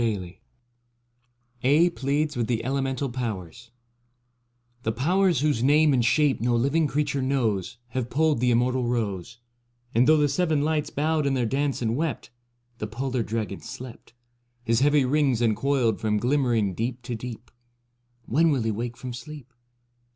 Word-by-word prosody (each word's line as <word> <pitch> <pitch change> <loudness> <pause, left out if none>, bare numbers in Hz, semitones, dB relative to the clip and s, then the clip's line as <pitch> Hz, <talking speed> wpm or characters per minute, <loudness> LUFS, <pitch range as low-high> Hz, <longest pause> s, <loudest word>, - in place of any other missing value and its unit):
56 100 -6 -2 1.2
AEDH 160 +7 +3
PLEADS 145 +3 -1
WITH 120 -2 -1
THE 115 -2 -1
ELEMENTAL 135 +1 -1
POWERS 115 -3 -5 1.1
The 110 - -1
Powers 175 - +2
whose 145 -6 +1
name 150 +2 +4
and 125 -2 +2
shape 145 +2 +2
no 120 0 +2
living 140 +6 +2
creature 145 -1 -1
knows 115 -7 -1
Have 125 -1 -3
pulled 155 -2 +2
the 125 +1 +2
Immortal 125 +1 +1
Rose; 110 -3 -3 0.6
And 120 +3 +4
though 155 0 +6
the 150 -1 +3
Seven 155 -1 +1
Lights 155 -1 0
bowed 155 0 0
in 135 - +1
their 125 -2 +1
dance 135 +2 -1
and 115 0 0
wept, 150 -4 -3 0.5
The 105 - -3
Polar 125 +3 -2
Dragon 110 -3 -3
slept, 120 -1 -10 0.5
His 115 -1 +2
heavy 145 0 +3
rings 135 -3 +2
uncoiled 120 0 +1
from 105 -1 +1
glimmering 120 -5 +1
deep 120 +5 -3
to 120 0 -5
deep: 115 0 -7 0.7
When 165 +6 +3
will 135 -6 +1
he 110 - 0
wake 120 +3 -4
from 125 -1 -6
sleep? 135 0 -10
125 Hz, 155 wpm, -25 LUFS, 115-145 Hz, 1.2 s, though